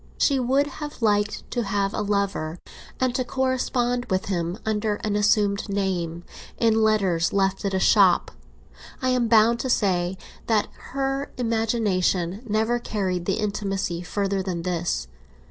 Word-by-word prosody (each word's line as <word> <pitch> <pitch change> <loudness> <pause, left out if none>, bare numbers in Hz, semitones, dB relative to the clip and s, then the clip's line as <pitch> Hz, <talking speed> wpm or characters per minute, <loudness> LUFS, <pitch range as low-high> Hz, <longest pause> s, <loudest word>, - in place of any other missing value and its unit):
She 275 -2 +3
would 265 +3 +2
have 295 -2 -7
liked 210 -1 +1
to 245 - 0
have 200 0 -1
a - - -1
lover, 200 -6 -1 0.4
and 255 -1 +1
to 255 - 0
correspond 250 -1 0
with 185 0 -1
him 175 -1 -1
under 215 -1 0
an 210 -1 0
assumed 205 0 +2
name 180 -4 -2 0.3
in 225 -1 +3
letters 195 -6 +2
left 195 0 +1
at 195 -1 0
a - - +2
shop; 190 -2 +4 0.7
I 255 - 0
am 250 -2 +2
bound 225 +1 +5
to 260 - -2
say 185 -5 +1 0.3
that 220 -2 +2 0.3
her 275 +1 -1
imagination 215 -6 0
never 220 +3 +1
carried 185 -6 -2
the 195 - +1
intimacy 195 -4 -2
farther 195 +1 -1
than 180 -3 -3
this. 170 - -1
205 Hz, 145 wpm, -24 LUFS, 190-235 Hz, 0.7 s, bound